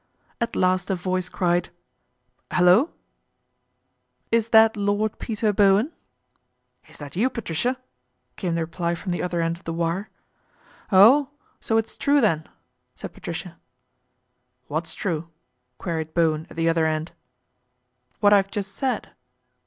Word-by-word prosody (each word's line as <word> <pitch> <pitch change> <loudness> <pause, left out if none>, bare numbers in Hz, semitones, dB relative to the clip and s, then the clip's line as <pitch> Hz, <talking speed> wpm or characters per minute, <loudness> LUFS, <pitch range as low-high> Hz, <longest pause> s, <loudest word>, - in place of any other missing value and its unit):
At 235 - -2
last 185 0 +1
a 190 - +1
voice 185 0 -2
cried, 175 -2 0 0.4
" - - -33
Hullo! 185 - +5 0.4
" - - -50
" - - -49
Is 230 0 +2
that 220 0 +6
Lord 205 +1 -1
Peter 215 -2 -1
Bowen? 200 +7 +4 0.3
" 125 0 -48
" 125 0 -35
Is - - -12
that 145 +1 -9
you, 230 +8 +2
Patricia? 240 +1 -2 0.3
" - - -49
came 175 -4 -2
the 170 - 0
reply 170 +1 -2
trom 180 +2 -4
he - - -2
other 175 -1 -1
end 165 0 -1
of 175 - -22
the 165 - -4
wire. 170 +4 -2 0.5
" - - -29
Oh, 245 +9 +7 0.3
so 225 - 0
it 225 - +2
is - - -11
true 285 +1 +3
then! 165 - +1 0.2
" 125 0 -50
said - - -8
Patricia. 170 0 -7 0.5
' 125 0 -49
What's 160 +3 -2
true? 170 -4 -3 0.2
" 125 0 -51
queried 160 -3 -4
Bowen 160 -1 +1
at - - -13
the 165 0 0
other 165 -1 +2
nd. 155 +1 -3 0.5
' 125 0 -46
What 205 0 +6
I've 195 -1 +4
just 200 -2 -4
said." 260 +5 -2
175 Hz, 170 wpm, -24 LUFS, 160-205 Hz, 0.5 s, Oh